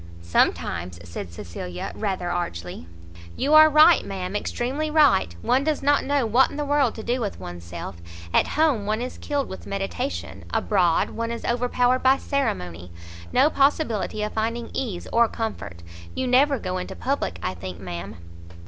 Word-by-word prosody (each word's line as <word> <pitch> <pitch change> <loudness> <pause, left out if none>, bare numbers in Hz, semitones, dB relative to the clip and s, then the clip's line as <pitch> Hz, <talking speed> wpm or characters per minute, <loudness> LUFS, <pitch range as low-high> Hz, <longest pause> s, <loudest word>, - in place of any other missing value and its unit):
"Sometimes!" 85 0 0
said 85 +1 -7
Cecilia, 85 +1 -6
rather 190 -4 -2
archly. 90 - -4 0.5
"You 285 +3 0
are 310 0 +9
right, 310 +3 +6
ma'am, 190 0 -5
extremely 265 +8 -2
right; 285 - +4
one 255 +3 +2
does 305 -1 -1
not 285 +1 +3
know 280 -2 +1
what 240 +4 +4
in - - -8
the 295 - -1
world 280 -4 +2
to 220 - -7
do 245 +2 -1
with 205 -3 -3
one's 90 -1 -8
self. 85 0 -7 0.4
At - - +4
home, 285 -10 +2
one 215 +1 0
is 255 - -7
killed 285 -2 -2
with 190 - -9
meditation, 200 +7 -4
abroad, 180 -5 +2
one 230 0 -3
is 235 0 -5
overpowered 245 +1 +1
by 260 +1 +5
ceremony; 90 - -3 0.4
no 300 - +4
possibility 275 -7 +1
of 210 - -3
finding 230 +2 -2
ease 210 -10 -3
or 235 0 +5
comfort. 220 - -5 0.3
You 260 - -1
never 270 +3 +4
go 185 -4 -3
into 180 - -6
public, 270 - -2
I 95 - -1
think, 90 0 -8
ma'am?" 90 +2 -6
225 Hz, 165 wpm, -24 LUFS, -, 0.5 s, are